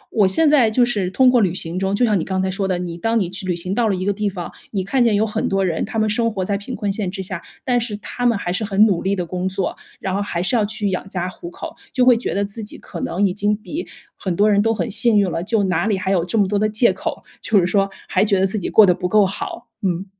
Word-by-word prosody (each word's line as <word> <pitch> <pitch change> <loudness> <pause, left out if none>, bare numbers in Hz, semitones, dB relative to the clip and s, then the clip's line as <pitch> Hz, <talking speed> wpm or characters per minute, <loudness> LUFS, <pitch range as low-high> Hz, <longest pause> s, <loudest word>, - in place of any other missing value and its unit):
我 210 -4 +5
现 250 +13 +3
在 280 -7 +5
就 240 +3 +3
是 205 -7 -1
通 260 +7 +3
过 245 -2 +4
旅 185 -4 +1
行 170 0 -3
中， 195 +1 0
就 245 - +3
像 210 -4 +2
你 - - -2
刚 190 -1 -2
才 190 0 0
说 195 +1 -2
的， 185 -2 0
你 175 -1 -5
当 225 +5 +1
你 180 -4 -2
去 195 0 -5
旅 180 - 0
行 180 +2 -3
到 230 +2 +1
了 200 - +1
一 185 0 -3
个 205 - +1
地 210 +1 -1
方， 180 -3 -6 0.2
你 195 -3 -2
看 250 +7 +1
见 230 -3 +3
有 210 +2 +2
很 210 - -2
多 195 0 +1
人 165 -3 -1
他 225 - -6
们 215 0 +2
生 230 +2 +1
活 190 -3 -3
在 200 - -1
贫 205 +6 -5
困 205 -1 -2
线 195 -2 -1
之 190 +1 -5
下， 185 -2 -5 0.2
但 245 -2 +2
是 220 -3 -4
他 245 +3 -7
们 235 -3 +2
还 175 -3 -3
是 205 - -1
很 205 0 +4
努 195 -6 +1
力 195 +1 0
地 180 -2 -3
工 180 +2 -3
作， 190 -1 -2 0.2
然 190 - -3
后 200 - 0
还 175 -4 -2
是 215 - +1
要 225 - +3
去 210 -1 -2
养 185 +1 -4
家 180 -2 -3
糊 345 - -8
口。 360 - -8 0.2
就 255 -2 +2
会 250 -1 +7
觉 230 - -3
得 200 +1 +1
自 205 +3 -7
己 205 - -7
可 170 - -8
能 195 +4 0
已 185 - +1
经 205 +2 +1
比 300 +10 -6 0.3
很 185 -3 -3
多 210 +3 +3
人 200 0 +4
都 225 +2 +2
很 225 - -1
幸 225 +1 +4
运 200 -2 +3
了， 165 - -2
就 215 +2 +1
哪 185 0 0
里 210 -3 +1
还 190 +1 -2
有 180 -4 +2
这 180 +6 -2
么 200 -3 +3
多 205 +1 0
的 215 +1 +1
借 215 +3 +3
口？ - - -5 0.2
就 215 -3 +3
是 175 - +2
说， 195 +2 +1 0.2
还 185 - +2
觉 200 -2 +2
得 190 - +3
自 195 +3 -2
己 185 - -3
过 215 - +7
得 180 - +4
不 180 +1 -3
够 210 0 +5
好， 195 +1 -5
嗯。 185 -2 -1
200 Hz, 335 characters per minute, -20 LUFS, 185-220 Hz, 0.3 s, 会